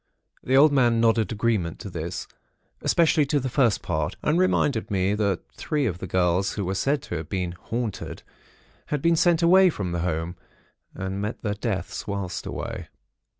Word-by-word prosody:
The 130 +1 +3
old 150 +2 +7
man 120 -4 +3
nodded 115 -3 +3
agreement 110 -6 0
to 100 - -6
this, 85 0 -5 0.5
especially 165 -2 +3
to 145 0 +2
the 130 0 -3
first 120 -6 +2
part, 80 -3 -1
and 155 +4 +2
reminded 145 -10 +1
me 95 0 +1
that 100 -4 0
three 150 -3 -1
of 90 -7 -2
the 95 - -5
girls 90 +2 +1
who 100 - -3
were 95 - -1
said 140 +8 0
to 85 - -4
have 80 -1 -7
been 90 -2 -2
'haunted' 115 +5 -5 0.6
had 150 -2 -2
been 170 0 +4
sent 170 0 +3
away 185 +2 +7
from 95 - -3
home, 85 0 -2 0.6
and 95 +1 -4
met 105 +3 -4
their 105 -2 0
deaths 100 -3 -4
whilst 100 -3 -4
away. - - -5
105 Hz, 175 wpm, -25 LUFS, 90-135 Hz, 0.6 s, old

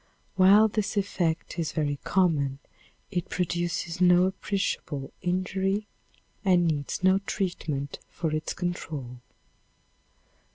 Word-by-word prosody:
While 200 +3 +7
this 215 -1 -2
effect 175 -4 -1
is 165 - -1
very 145 -3 -1
common, 150 -8 +2 0.5
it 180 -2 -2
produces 175 0 -2
no 180 0 +6
appreciable 185 -7 -2
injury 190 +3 0 0.6
and 180 -3 +4
needs 150 +2 -2
no 190 +1 +5
treatment 165 -8 -3
for 165 -3 -3
its 155 0 -2
control. 150 -8 -4
175 Hz, 100 wpm, -27 LUFS, 155-190 Hz, 0.6 s, While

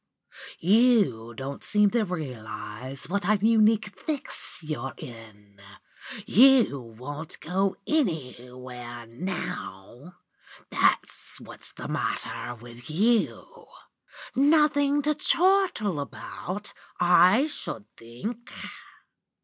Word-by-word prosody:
You 190 - +3
don't 135 +3 -6
seem 210 -1 +3
to 235 - +2
realise 125 - -6
what 200 +2 -1
a 215 - +5
unique 215 0 +4
fix 300 -4 -3
you're 140 -4 -4
in. 105 -4 -12 0.6
You 250 - +6
won't 130 +7 -8
go 190 +3 0
anywhere 125 - -3
now! 120 - -6 0.6
That's - - +1
what's - - -7
the - - -7
matter 120 - -3
with 120 +2 -12
you. 215 +8 0 0.7
Nothing 290 0 +4
to 300 +1 +2
chortle 335 - +2
about, 185 +7 -6 0.3
I 180 - +6
should 115 - -5
think? 215 - -7
175 Hz, 90 wpm, -27 LUFS, -, 0.7 s, You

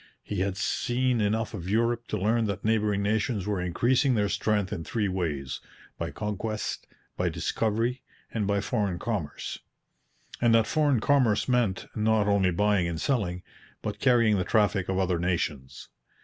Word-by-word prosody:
He - - -4
had 95 0 -1
seen 125 +1 0
enough 110 +3 0
of 95 -3 -5
Europe 115 +2 +1
to 105 - -2
learn 110 +4 +1
that 100 -1 -3
neighbouring 105 -2 +1
nations 105 -1 0
were 100 -3 -1
increasing 125 +9 +2
their 105 -2 +1
strength 105 -2 0
in 80 - -4
three 105 +3 -1
ways 75 -8 -2 0.4
by - - -2
conquest, 105 +1 -4 0.3
by - - 0
discovery, 115 +3 -1 0.3
and 105 -3 -1
by 100 -1 +1
foreign 100 -5 -1
commerce 95 -6 -4 0.8
and 120 -1 +5
that 115 -1 +4
foreign 145 -5 +2
commerce 130 -7 +3
meant, 120 -7 +1
not 110 -1 +2
only 100 -2 +3
buying 100 0 +2
and 85 -2 -3
selling, 90 - -1 0.4
but - - -4
carrying 115 -6 +4
the - - +1
traffic 100 -2 +1
of 95 - 0
other 90 -2 +1
nations. 80 -6 -2
105 Hz, 160 wpm, -27 LUFS, 95-115 Hz, 0.8 s, and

